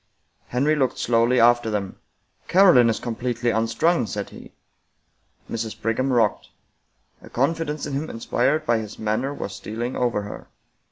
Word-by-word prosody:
Henry 140 +5 +1
looked 130 -4 0
slowly 120 +1 +2
after 120 0 +4
them. 100 -3 -3 0.2
" - - -40
Caroline 175 -11 +6
is 110 - -1
completely 120 0 -2
unstrung," 115 +7 +1
said 100 -1 -5
he. - - -12 1.0
Mrs. 110 -1 -5
Brigham 130 +4 0
rocked. 115 -5 +1 0.7
A - - -13
confidence 150 +2 -1
in 140 - -5
him 145 +3 -3
inspired 135 +6 0
by 120 -4 +2
his 110 -1 -8
manner 110 +5 -1
was 100 -8 -6
stealing 115 +5 -5
over 120 -4 0
her. 105 - -9
120 Hz, 150 wpm, -23 LUFS, 110-135 Hz, 1.0 s, Caroline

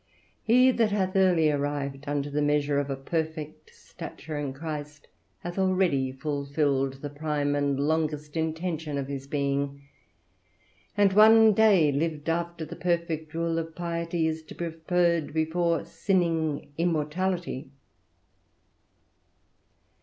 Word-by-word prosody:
He 250 +3 +5
that 230 -3 +2
hath 190 -2 0
early 180 -5 +4
arrived 145 -1 -3
unto 145 0 -2
the 150 +1 0
measure 145 -1 +2
of 145 0 -2
a 135 - -1
perfect 155 - -4
stature 160 - -9
in 145 -2 -2
Christ, 150 0 -7 0.3
hath 175 +2 -5
already 185 -9 +2
fulfilled 140 -1 -1
the 145 - -3
prime 145 -1 -1
and 140 -1 0
longest 150 0 -1
intention 160 -2 -2
of 140 - -2
his 140 -1 -6
being; 140 0 -2 1.1
and 200 -2 +4
one 220 +1 +7
day 195 -8 +5
lived 150 +1 -2
after 170 0 -2
the - - -8
perfect 170 -3 -2
rule 165 0 0
of 165 0 -6
piety 170 -1 -2
is 160 0 -1
to - - -11
be 170 -1 -3
preferred 165 -1 0
before 165 +1 +1
sinning 165 -6 0
immortality. 170 -2 -1
160 Hz, 125 wpm, -27 LUFS, 145-170 Hz, 1.1 s, one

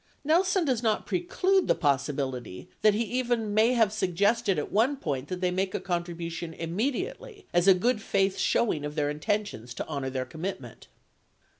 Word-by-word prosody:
37 - - -12
Nelson 360 +2 +3
does 255 -5 +1
not 220 -3 0
preclude 370 +1 +1
the - - +4
possibility 135 - -2
that 215 -1 +5
he 225 - +1
even 240 -3 -1
may 220 +4 +4
have 225 -4 +3
suggested 200 +2 +1
at 150 - -3
one 245 +7 +2
point 140 - -3
that 180 +2 -5
they 180 -1 +1
make 185 +1 -1
a - - 0
contribution 170 -2 -4
immedi 250 - -2
ately 465 -6 -13
as 175 +2 +3
a 190 - +8
good 225 +4 +1
faith 195 -2 +1
showing 165 -10 +1
of 150 0 -5
their 145 -2 0
intentions 150 - -3
to - - -4
honor 140 -4 -3
their 130 -1 -3
commit 175 +7 -5
ment. 120 -4 -13
195 Hz, 185 wpm, -28 LUFS, 155-235 Hz, -, a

